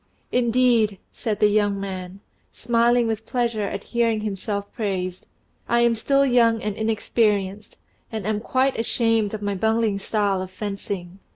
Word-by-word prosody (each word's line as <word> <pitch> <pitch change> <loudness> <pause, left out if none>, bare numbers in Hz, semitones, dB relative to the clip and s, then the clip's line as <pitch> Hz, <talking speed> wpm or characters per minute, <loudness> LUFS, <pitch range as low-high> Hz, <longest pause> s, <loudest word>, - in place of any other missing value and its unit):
"Indeed," 235 -4 +3
said 220 -4 -3
the 210 - +5
young 205 -1 +1
man, 190 -1 -6 0.3
smiling 235 +1 +2
with 225 -1 -3
pleasure 235 -4 0
at 200 0 -5
hearing 230 -2 0
himself 200 0 -4
praised; 185 -5 -3 0.4
"I 235 0 +3
am 235 0 +4
still 275 +5 +2
young 235 -3 +4
and 210 -2 -3
inexperienced, 210 -2 0 0.3
and 220 -4 -4
am 215 0 0
quite 260 +3 0
ashamed 225 -2 +1
of 210 - -7
my 205 0 -1
bungling 220 0 +1
style 200 -2 0
of 185 - -5
fencing." 195 -2 -5
215 Hz, 150 wpm, -23 LUFS, 200-230 Hz, 0.4 s, the